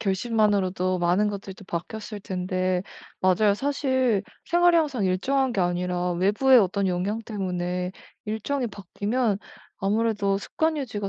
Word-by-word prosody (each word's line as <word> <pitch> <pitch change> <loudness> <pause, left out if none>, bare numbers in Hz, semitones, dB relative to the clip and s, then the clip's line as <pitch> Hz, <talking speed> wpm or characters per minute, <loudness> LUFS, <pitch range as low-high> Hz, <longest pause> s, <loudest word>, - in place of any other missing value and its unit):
결심만으로도 195 -3 +1
많은 180 +5 +2
것들이 200 -1 -6
또 200 -1 -14
바뀌었을 210 +5 -5
텐데. 185 -1 -1 0.4
맞아요, 195 +2 +4
사실 260 -3 +1 0.2
생활이 350 0 +4
항상 280 -10 +1
일정한 255 +8 +1
게 195 - 0
아니라 180 0 0
외부의 210 +9 +4
어떤 195 -1 +1
영향 190 +5 -1
때문에 180 -3 -3 0.3
일정이 235 +5 -2
바뀌면 205 +2 -1 0.4
아무래도 205 -1 +1
습관 315 +8 -1
유지가 215 -8 -3
200 Hz, 325 characters per minute, -25 LUFS, 185-230 Hz, 0.4 s, 맞아요